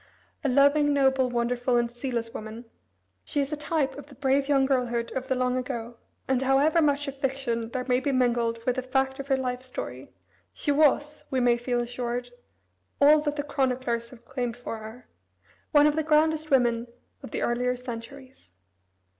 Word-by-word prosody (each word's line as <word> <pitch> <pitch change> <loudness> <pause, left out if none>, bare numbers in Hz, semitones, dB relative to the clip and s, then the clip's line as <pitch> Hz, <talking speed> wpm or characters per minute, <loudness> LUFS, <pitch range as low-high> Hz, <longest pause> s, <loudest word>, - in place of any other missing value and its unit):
A 280 - +1
loving, 285 +2 +4
noble, 265 -2 +3
wonderful, 245 +1 0
and 240 0 +2
zealous 240 -2 -4
woman, 220 +2 -7 0.6
she 290 - -2
is 280 +2 -1
a - - +1
type 295 -1 -1
of 285 - -11
the 280 - -15
brave 275 +1 +1
young 275 -2 +4
girlhood 245 -3 0
of 260 0 -4
the 260 - +1
long 250 0 0
ago, 240 -2 -4 0.3
and, 265 -1 +1
however 275 +5 +3
much 290 -1 +1
of 275 0 -5
fiction 260 -4 -2
there 250 +1 -3
may 250 -1 +3
be 275 +2 -1
mingled 235 -3 +1
with 250 0 0
the - - +1
fact 265 +1 -1
of 275 - -5
her 270 -1 +2
life 250 -1 -3
story, 255 0 -7 0.4
she 290 - -1
was, 295 0 +2
we 260 - 0
may 245 -1 +4
feel 240 0 -1
assured, 245 0 -3 0.7
all 295 +2 +7
that 295 -1 -2
the 290 - -2
chroniclers 255 -4 -1
have 240 -2 -16
claimed 245 -2 -3
for 235 -2 -6
her 220 +3 -11 0.6
"one 295 -2 +6
of 300 0 +3
the 315 - +1
grandest 310 0 +2
women 240 -3 +2 0.3
of - - -9
the - - -3
earlier 250 +1 0
centuries." 250 - -9
255 Hz, 185 wpm, -27 LUFS, 240-280 Hz, 0.7 s, all